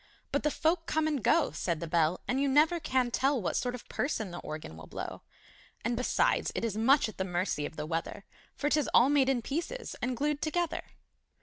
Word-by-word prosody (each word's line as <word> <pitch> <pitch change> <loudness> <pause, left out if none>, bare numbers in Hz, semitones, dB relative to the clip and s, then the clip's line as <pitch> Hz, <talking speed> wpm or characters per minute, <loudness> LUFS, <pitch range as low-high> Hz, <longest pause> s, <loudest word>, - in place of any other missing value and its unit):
But 285 - +1
the 300 - +2
folk 330 +3 0
come 310 0 +1
and 290 -7 -1
go, 320 +5 +3
Said 170 -3 -2
the 170 - -4
Bell, 165 +1 +1
And 260 +2 +1
you 280 - +2
never 305 +5 +4
can 260 -5 0
tell 270 +2 +2
What 185 - -2
sort 250 0 -1
of 250 - -11
person 220 -8 -2
the 175 - -6
Organ 155 - -7
will 80 0 -11
blow! - - -6 0.6
And, 235 +1 +1
besides, 250 +2 +1
it - - -1
is 220 -3 -2
much 265 +6 +4
at 215 - -10
the - - +2
mercy 175 -5 -1
of - - -13
the 150 - -4
weather 165 +4 -4 0.3
For 290 - -1
'tis 295 -1 +2
all 245 +3 +7
made 280 -2 +4
in 250 -3 +1
pieces 345 - -4
and 245 0 -1
glued 295 +2 0
together! 335 +1 -1
255 Hz, 220 wpm, -30 LUFS, 190-300 Hz, 0.6 s, all